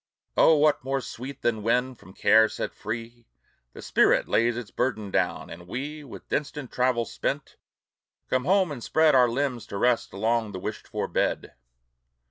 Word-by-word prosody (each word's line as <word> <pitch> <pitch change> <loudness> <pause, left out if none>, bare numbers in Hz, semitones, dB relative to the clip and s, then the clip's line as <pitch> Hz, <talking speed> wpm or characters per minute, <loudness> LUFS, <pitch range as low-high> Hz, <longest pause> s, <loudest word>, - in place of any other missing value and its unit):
Oh, 160 - +6
what 150 -3 +3
more 135 +1 -1
sweet 130 +2 -8
than 110 -2 0
when, 125 +4 +1
from 95 -5 -17
care 110 +2 +5
set - - -4
free, 115 +2 -7 0.5
The - - -10
spirit - - +3
lays 115 +1 +2
its 120 -3 -7
burden 110 -5 -2
down, - - -1
and 85 +1 -10
we, 145 +8 -5
With 135 - -11
distant 145 -3 -3
travel 125 -2 +1
spent, - - -4 0.7
come 130 0 0
home 190 -1 +3
and 125 -5 -6
spread 160 -1 +3
Our 125 -2 +5
limbs 125 -1 -2
to 100 - -5
rest 120 +3 +1
along 110 +2 0
the 95 - -5
wished - - -6
for - - -3
bed! - - -1
120 Hz, 170 wpm, -26 LUFS, 110-135 Hz, 0.7 s, Oh